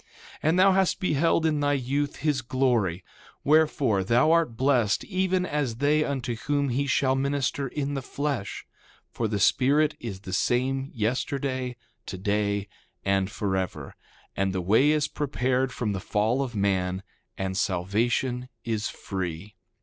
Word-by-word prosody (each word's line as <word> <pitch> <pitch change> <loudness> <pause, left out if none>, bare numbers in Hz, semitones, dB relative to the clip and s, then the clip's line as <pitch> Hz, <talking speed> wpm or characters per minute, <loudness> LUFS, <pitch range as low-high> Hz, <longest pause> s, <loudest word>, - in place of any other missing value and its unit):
2:4 - - -35 0.3
And 160 +3 +2
thou 190 +1 +6
hast 190 -1 +2
beheld 165 -2 +2
in 155 -2 +2
thy 145 0 +2
youth 140 +2 -1
his 150 -4 0
glory; 120 -9 0 0.4
wherefore, 145 -9 +3
thou 120 +10 +3
art 165 -9 +2
blessed 125 -5 +2
even 185 -2 0
as 145 -8 -1
they 145 +4 +2
unto 130 -5 -2
whom 145 +3 0
he 140 +3 0
shall 130 0 +2
minister 140 0 0
in 145 +1 -3
the 135 - -2
flesh; 140 -6 -3 0.5
for 115 - -1
the 105 -1 -2
Spirit 145 +9 +3
is 100 -5 -6
the 95 -2 -7
same, 135 +6 0
yesterday, 130 +2 -1 0.3
today, 100 +1 -1 0.4
and 95 -1 +1
forever. 95 -3 -3 0.4
And 95 -1 0
the 95 - -1
way 110 +11 +4
is 150 -1 +2
prepared 130 -3 -1
from 115 -4 -2
the 95 - -2
fall 110 +7 0
of 125 -4 -4
man, 95 -2 0 0.3
and 95 0 -2
salvation 115 +7 0
is 110 -3 -2
free. 95 +1 -5
125 Hz, 150 wpm, -26 LUFS, 105-145 Hz, 0.5 s, thou